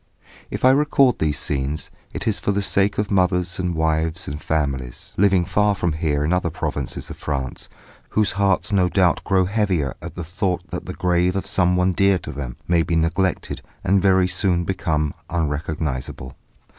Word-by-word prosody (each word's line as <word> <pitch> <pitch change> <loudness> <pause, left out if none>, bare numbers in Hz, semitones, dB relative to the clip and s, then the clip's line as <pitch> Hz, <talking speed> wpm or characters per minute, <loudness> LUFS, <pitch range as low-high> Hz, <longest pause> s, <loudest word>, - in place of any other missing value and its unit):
If - - -2
I 130 - +8
record 140 -3 +3
these 75 -2 0
scenes, 70 +2 -2 0.2
it - - -5
is - - +1
for - - 0
the 100 0 0
sake 100 +1 +2
of 105 0 -1
mothers 90 -1 +1
and 90 -2 -1
wives 80 +2 0
and 75 +2 -5
families, 70 -6 -2
living 95 -2 +3
far 105 +2 +2
from 85 -4 0
here 75 -2 0
in 80 - +1
other 90 -1 +1
provinces - - -4
of - - -8
France, 65 -4 -4 0.4
whose 105 -1 +2
hearts 100 0 +1
no 95 -3 +3
doubt 90 -3 +2
grow 95 -1 +2
heavier 95 - 0
at 85 -1 -8
the 90 - -4
thought 90 +1 -2
that - - -5
the - - -5
grave 90 0 +1
of 95 - -2
someone 90 0 +2
dear 100 +1 +3
to 85 - -6
them 70 -3 -6
may 85 -1 +3
be 85 0 -1
neglected 85 +3 0 0.2
and 95 +1 +3
very 95 -1 +4
soon 90 -2 +1
become 80 -5 -1 0.2
unrecognisable. 75 -5 -3
90 Hz, 180 wpm, -22 LUFS, 80-95 Hz, 0.4 s, I